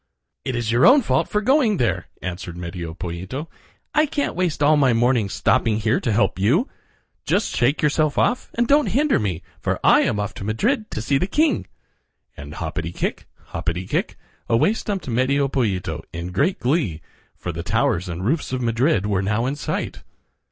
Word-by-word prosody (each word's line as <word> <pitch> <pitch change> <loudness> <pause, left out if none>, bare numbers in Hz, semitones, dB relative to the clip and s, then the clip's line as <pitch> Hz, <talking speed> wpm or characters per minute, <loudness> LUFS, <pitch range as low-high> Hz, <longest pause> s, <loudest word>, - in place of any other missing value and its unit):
"It 130 - -3
is 120 -2 -1
your 120 +2 +5
own 265 +2 +7
fault - - +1
for 210 - 0
going 245 -3 +3
there," 95 - 0 0.2
answered 90 -1 -5
Medio 85 -2 -6
Pollito. 90 - -5 0.5
"I 305 0 +3
can't 285 0 -1
waste 175 -5 -1
all 150 +2 +5
my 135 -4 +4
morning 120 -3 +2
stopping 110 +2 +1
here 110 +1 +1
to 115 - -1
help 100 -3 +1
you. 145 - +3 0.6
Just 205 - 0
shake 140 +5 +1
yourself 150 0 +2
off, 245 - +1
and 240 0 +1
don't 290 +2 +4
hinder 295 +3 +2
me, 95 -5 -2 0.2
for - - -1
I - - +6
am 105 - 0
off 105 0 -3
to - - -8
Madrid 215 - 0
to 110 - -4
see 135 +3 +1
the 185 - 0
king," 300 +7 +1 0.7
and 75 +1 -9
hoppity 80 0 -4
kick, - - -3 0.3
hoppity 90 +2 -2
kick, - - -2 0.3
away 115 - +3
stumped 205 -6 -4
Medio 130 +3 +1
Pollito 95 - -1
in 85 +2 -5
great 140 - +1
glee, 125 - 0 0.4
for 90 - -4
the 85 0 -5
towers 100 -1 0
and 85 +2 -4
roofs 145 +5 0
of 130 - -1
Madrid 115 - +1
were 100 -2 +1
now 105 +4 0
in 135 +3 -1
sight. 145 - -4
120 Hz, 185 wpm, -22 LUFS, -, 0.7 s, own